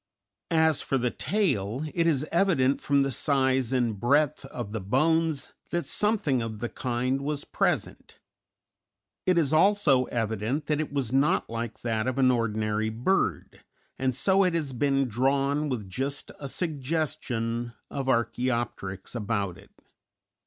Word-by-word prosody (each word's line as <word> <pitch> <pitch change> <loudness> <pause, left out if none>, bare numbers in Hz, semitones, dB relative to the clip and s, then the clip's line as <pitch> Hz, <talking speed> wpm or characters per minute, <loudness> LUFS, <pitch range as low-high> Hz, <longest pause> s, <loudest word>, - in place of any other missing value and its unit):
As 160 -3 +3
for 135 - 0
the 125 -1 0
tail, 140 - -1
it 170 -1 +2
is 150 -3 +2
evident 165 -7 +2
from 140 -1 +3
the 135 - -1
size 130 -3 +1
and 120 -6 0
breadth 145 +4 +2
of 120 -5 -6
the 110 -1 -3
bones 155 +8 +1 0.2
that 175 0 -1
something 205 - +1
of 115 -1 -4
the 120 +2 -4
kind 130 +2 -1
was 145 0 -3
present; - - -2 1.1
it 180 -1 +4
is 155 -3 +2
also 155 -7 +4
evident 115 +5 -2
that 150 -1 0
it 155 - -2
was 135 -4 -2
not 135 -3 +2
like 115 -1 -4
that 115 -1 -1
of 130 - -1
an 130 -1 +5
ordinary 110 -2 0
bird, 120 - -1 0.4
and 130 -1 0
so 190 +8 +3
it 180 -2 +1
has 150 -5 -2
been 135 +1 +1
drawn 140 +5 +1
with 115 -7 -3
just 135 +9 -4
a 140 - -5
suggestion 135 -7 -2 0.2
of 135 -1 -3
Archæopteryx 115 -5 -1
about 100 -5 -2
it. 95 +2 -16
130 Hz, 145 wpm, -27 LUFS, 115-150 Hz, 1.1 s, an